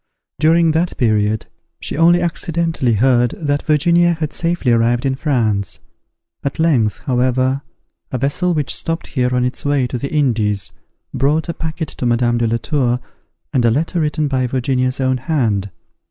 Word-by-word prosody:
During 165 +1 +4
that 165 +3 -1
period 110 -2 +1 0.3
she - - -4
only 170 +3 +4
accidently 165 -6 0
heard 120 +1 +2
that 145 -2 -1
Virginia 170 +3 +3
had 155 -2 -4
safely 170 -7 0
arrived 120 +2 +2
in 135 - +1
France. 115 -8 -1 0.6
At 140 - -3
length, 130 -11 +1
however, 130 +1 +1 0.5
a 130 - -1
vessel 165 +7 0
which 150 -3 0
stopped 165 0 -3
here 125 -2 -1
on 125 0 +2
its 125 - -3
way 145 -2 +1
to 125 0 -4
the 140 - -4
Indies 110 - 0 0.4
brought 150 +5 +1
a - - -1
packet 160 -1 -4
to 125 - -3
Madame 120 0 +2
de 115 - +1
la 115 +1 +1
Tour, 125 -2 0 0.5
and 130 - +2
a 120 - +4
letter 160 +8 0
written 150 0 0
by 130 -2 0
Virginia's 130 +1 -1
own 130 -1 +1
hand. 115 -8 -1
130 Hz, 165 wpm, -18 LUFS, 120-155 Hz, 0.6 s, During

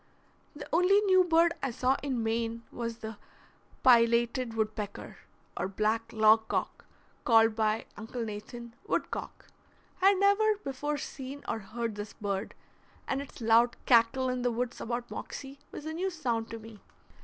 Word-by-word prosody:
The 290 - -8
only 365 +4 +5
new 375 -2 +5
bird 335 -1 +4
I 270 - -1
saw 255 +2 +1
in 260 -5 -2
Maine 230 +1 -1
was 230 -1 -4
the 220 -2 -7 0.7
pileated 235 0 +4
woodpecker, 215 -2 -4 0.4
or - - -2
black 215 +3 -1
"log 220 0 +5
cock," - - -3 0.4
called 225 -1 +5
by 220 0 0
Uncle 230 +2 -5
Nathan 230 +3 -8
"wood - - -1
cock." - - -6 0.6
I 380 - +6
had 400 - +3
never 410 +2 +4
before 290 +2 -2
seen 275 0 -7
or 225 - -2
heard 225 +2 -4
this 205 0 -7
bird, 200 0 -4 0.5
and 270 - -1
its 280 - -11
loud 230 +1 +4
cackle 245 +2 +4
in 250 0 -2
the 245 - +1
woods 240 +1 -3
about 240 +1 -4
Moxie 275 0 -7
was 295 - -8
a 315 - -4
new 365 +4 -1
sound 240 -10 -2
to 230 - -6
me. 220 -1 -12
235 Hz, 160 wpm, -30 LUFS, 225-275 Hz, 0.7 s, I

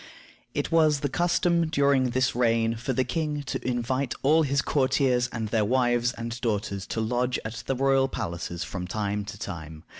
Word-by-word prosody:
It - - -1
was 155 -3 +4
the 145 - 0
custom 170 +1 +2
during 140 -4 +3
this 125 0 +1
reign 115 -2 +2
for 120 +4 -3
the 130 +1 +1
king 150 +3 -2
to 130 - -4
invite 125 +1 -1
all 155 +4 +5
his 140 -2 +1
courtiers 130 -3 +2
and 110 -2 -3
their 110 -1 +2
wives 120 +1 +2
and 115 +1 -6
daughters 105 -4 -2
to - - -3
lodge 120 +3 0
at 110 +1 -5
the 135 - 0
royal 135 0 +3
palaces 85 -6 -4
from 90 0 -5
time 105 +1 -2
to 100 - -8
time. 80 -4 -7
125 Hz, 180 wpm, -26 LUFS, 110-135 Hz, -, all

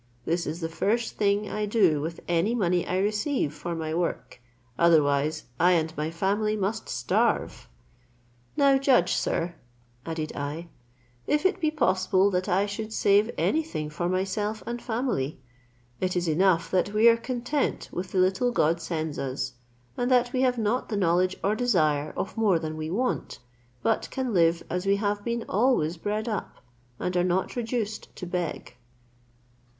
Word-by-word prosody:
This 170 +1 -1
is 160 +4 -4
the 165 - -1
first 220 +8 -1
thing 205 0 +1
I 210 0 -2
do 190 -9 +3
with 165 +2 -5
any 175 +7 +1
money 180 -5 +1
I 185 - 0
receive 210 - 0
for 165 +3 -5
my 160 -1 -3
work; 170 -7 -3 0.3
otherwise 155 -2 +3 0.2
I 180 +2 +5
and 160 -1 0
my 150 +1 -2
family 200 +5 0
must 210 +3 -2
starve. 120 0 0 0.9
"Now 275 -1 +5
judge, 255 -10 +3
sir," 170 +1 -1 0.5
added 160 -2 -4
I, 150 +4 -5 0.6
"if 300 +4 +1
it 380 - +2
be 310 - +3
possible 190 -8 +2
that 185 +1 -1
I 195 +2 +3
should 215 +2 -5
save 205 +1 +3
any 320 - +2
thing 155 - -5
for 175 +3 -2
myself 195 +4 -1
and 240 0 -4
family: 220 - -2 0.6
it 185 0 -1
is 175 -1 0
enough 165 +1 +2
that 190 +2 +1
we 220 +2 +6
are 230 - +7
content 245 +4 -2
with 180 +1 -5
the - - -2
little 190 +7 +2
God 170 -6 +2
sends 160 -2 -3
us, 130 -1 -3 0.4
and 245 +1 -1
that 245 -1 +3
we 255 - +1
have 250 -1 +2
not 230 +3 0
the 210 - -1
knowledge 185 0 +2
or 200 - +2
desire 155 -11 +1
of - - -3
more 215 -6 +3
than 155 -1 -4
we 155 0 -4
want, 245 +9 -2 0.5
but 225 - 0
can 260 -3 -2
live 170 -2 +3
as 180 +2 -3
we 200 - +4
have 205 0 -1
been 235 0 -2
always 195 -7 +2
bred 210 +6 -2
up, 215 -3 -3 0.4
and 180 - -2
are 175 - +3
not 180 +1 0
reduced 225 -3 -3
to - - -6
beg." 175 -8 -4
190 Hz, 170 wpm, -26 LUFS, 165-220 Hz, 0.9 s, are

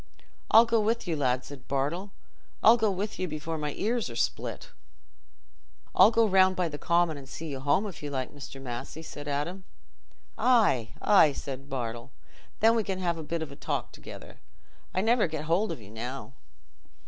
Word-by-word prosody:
"I'll 225 +2 +8
go 230 -1 +2
with 225 0 0
you, 165 - 0
lad," 130 -3 0
said 135 -3 -11
Bartle; 150 +9 -1 0.5
"I'll 225 - +9
go 220 -3 +2
with 200 +3 -3
you 185 - -1
before 155 0 -4
my 150 -1 -3
ears 230 +2 -1
are - - -8
split." - - -2 1.2
"I'll - - +7
go 230 -1 +3
round 190 -1 +5
by 180 -2 0
the 145 -1 -7
Common 170 -3 +2
and 135 -1 -11
see 165 0 -6
you 135 -2 -4
home, 145 +9 +2
if 195 -5 -7
you 145 - -4
like, 130 -3 -3
Mr. 140 -1 -9
Massey," 130 +5 -6
said 145 -2 -8
Adam. 150 +7 -3 0.8
"Aye, 215 - +3
aye!" 185 -8 +6
said 135 0 -7
Bartle; 120 -1 -4 0.5
"then 225 +1 +6
we 225 - +2
can 195 -2 -3
have 170 -3 -1
a - - -5
bit 165 +1 -3
o' 140 -3 -8
talk - - -3
together. - - -11 0.5
I 185 - 0
never 225 -1 +3
get 155 -1 -4
hold 175 +7 +1
of - - -5
you 105 -2 -13
now." 125 +4 -6
160 Hz, 185 wpm, -28 LUFS, 140-200 Hz, 1.2 s, I'll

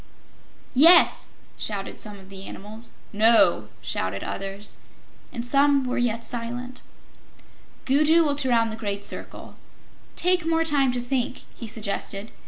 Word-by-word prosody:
"Yes!" 330 +7 +6 0.3
shouted 200 -2 -5
some 210 -2 -6
of 190 -1 -15
the 195 0 -9
animals. 215 +4 -10 0.2
"No!" 205 - +4
shouted 95 +1 -3
others. 195 +1 -7 0.5
And 235 0 -5
some 280 +2 +3
were 250 - -2
yet 230 -1 -1
silent. 245 +2 -6 1.0
Gugu 305 +5 +4
looked 290 -2 0
around 230 -3 +2
the - - -5
great 200 -1 -3
circle. - - -4 0.6
"Take 360 0 +2
more 325 0 +1
time 280 -4 +2
to 245 - -1
think," 245 0 -2
he 230 - -9
suggested. 210 -1 -4
235 Hz, 130 wpm, -24 LUFS, 205-275 Hz, 1.0 s, Yes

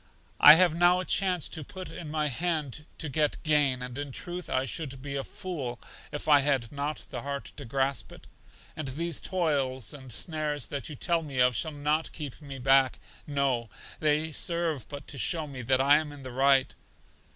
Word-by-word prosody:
I 150 - +11
have 175 -1 +4
now 175 +2 +4
a 185 - -3
chance 185 -4 +2
put 175 +4 -6
in 160 - -7
my 150 0 0
hand 150 0 -2
to 160 - -3
get 150 +1 +1
gain, 145 -5 +3
and 125 -1 -6
in 145 -1 -4
truth 175 +6 -6
I 130 +1 +1
should 135 +2 -3
be 140 -1 -5
a 135 - -2
fool 145 - -5 0.3
if 145 - -5
I 145 -2 +7
had 135 -5 0
not 145 +1 -4
the - - -4
heart 140 0 -5
to 145 - -7
grasp 135 +3 -1
it. - - -13 0.5
And 155 -3 -5
these 165 +4 -2
toils 140 - -1
and 130 -3 -10
snares 150 - -2
that 140 0 -3
you 150 - -6
tell 170 +4 +1
me 145 -4 -7
of 125 -1 +4
shall 160 - -2
not 150 +2 -1
keep 150 -2 -7
me 140 -2 -8
back; 135 0 +4 0.3
no, 135 -5 0 0.3
they 155 +1 +1
serve 170 - 0
but 145 -1 -7
to 140 - -6
show 160 +3 +1
me 135 -3 -7
that 130 +2 +2
I 140 +2 +6
am 155 -1 -3
in 145 -2 -11
the 130 - -7
right. 135 +1 +3
145 Hz, 195 wpm, -28 LUFS, 135-160 Hz, 0.5 s, I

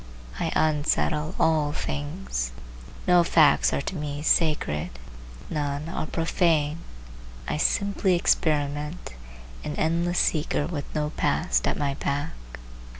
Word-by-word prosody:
I 165 - -1
unsettle 155 +1 +1
all 155 -2 +2
things. 145 - -3 0.5
No 180 -1 +6
facts 160 -3 +4
are 140 - -1
to 185 - -4
me 150 -2 -4
sacred; 150 - +1 0.6
none 145 0 -2
are 155 - -3
profane; 165 -2 +1 0.7
I 150 - -1
simply 200 +2 +2
experiment, 150 - 0 0.5
an 150 - -4
endless 170 +2 0
seeker 150 -2 +1
with 150 -3 -4
no 150 0 -1
Past - - +1
at - - 0
my 140 -2 0
back. 140 +1 -2
150 Hz, 115 wpm, -26 LUFS, 145-165 Hz, 0.7 s, No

